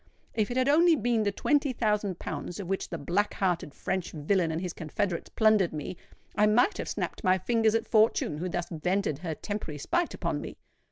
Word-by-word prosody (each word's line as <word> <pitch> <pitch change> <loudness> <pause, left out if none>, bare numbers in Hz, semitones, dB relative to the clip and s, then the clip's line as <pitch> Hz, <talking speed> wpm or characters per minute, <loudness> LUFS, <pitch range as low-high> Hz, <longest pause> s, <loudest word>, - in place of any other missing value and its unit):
If 215 -2 0
it 245 - -2
had 255 0 +2
only 330 +3 +5
been 235 -3 +1
the 205 -1 +1
twenty 285 +5 +1
thousand 210 -5 0
pounds 175 - -5
of 195 - -5
which 195 +1 -2
the 170 - -4
black 180 +8 0
hearted 180 -5 0
French 185 -2 -3
villain 165 +3 +1
and 160 - -2
his 180 -1 -4
confederates 170 +2 -3
plundered 215 -6 +3
me, 155 +4 -5 0.4
I 210 0 +4
might 245 - +3
have - - -3
snapped - - -4
my 185 0 +4
fingers 225 +3 +2
at 225 - 0
Fortune 215 -9 +2
who 180 +2 -2
thus 175 0 -2
vented 175 -2 -1
her 160 -2 -4
temporary 185 -5 -5
spite 345 - -1
upon - - -2
me! - - -8
200 Hz, 205 wpm, -28 LUFS, 175-220 Hz, 0.4 s, only